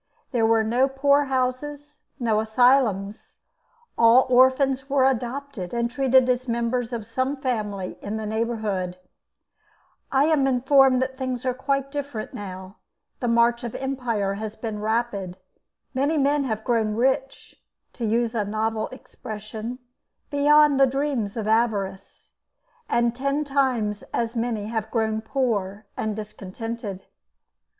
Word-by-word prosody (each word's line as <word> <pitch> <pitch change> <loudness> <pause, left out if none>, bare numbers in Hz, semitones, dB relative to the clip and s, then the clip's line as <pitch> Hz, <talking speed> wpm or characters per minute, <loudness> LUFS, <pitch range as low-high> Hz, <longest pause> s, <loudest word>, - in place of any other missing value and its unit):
There 230 -4 +2
were 225 0 +3
no 240 +5 +2
poor 280 +1 +3
houses, 280 +3 -3 0.2
no 225 -3 +1
asylums. 220 -3 +2 0.6
All 235 +3 +7
orphans 260 +2 +4
were 270 -1 +3
adopted 255 -5 -2
and 235 0 0
treated 260 0 +4
as 250 0 0
members 235 +1 -1
of 230 -3 -4
some 260 +5 -1
family 210 -8 -3
in 210 +2 -4
the 220 - -4
neighbourhood. 215 -5 -2 1.1
I 270 +1 +4
am 305 -4 +3
informed 265 0 +4
that 260 +1 -6
things 255 -1 -3
are 255 - +1
quite 275 +1 -1
different 280 -6 -5
now. 190 0 -8 0.4
The 245 - -2
march 235 +1 +3
of 235 - -5
empire 245 -7 -1
has 220 0 -5
been 220 -2 -5
rapid; 215 -4 -2 0.6
many 280 +4 +1
men 285 0 +2
have 220 -3 -3
grown 220 -3 +1
rich, 265 +3 -1 0.3
to 240 - -7
use 230 +1 +1
a 220 -3 0
novel 220 +1 -1
expression, 220 -1 -8 0.5
beyond 295 0 +5
the 270 - +6
dreams 260 -6 -2
of 215 -2 -3
avarice, 200 -4 -1 0.6
and 235 0 +1
ten 275 +3 0
times 255 -7 0
as 230 0 -2
many 230 -3 -1
have 220 0 -3
grown 220 -1 0
poor 220 -5 -2
and 215 -1 -2
discontented. 210 0 -6
235 Hz, 135 wpm, -24 LUFS, 220-265 Hz, 1.1 s, All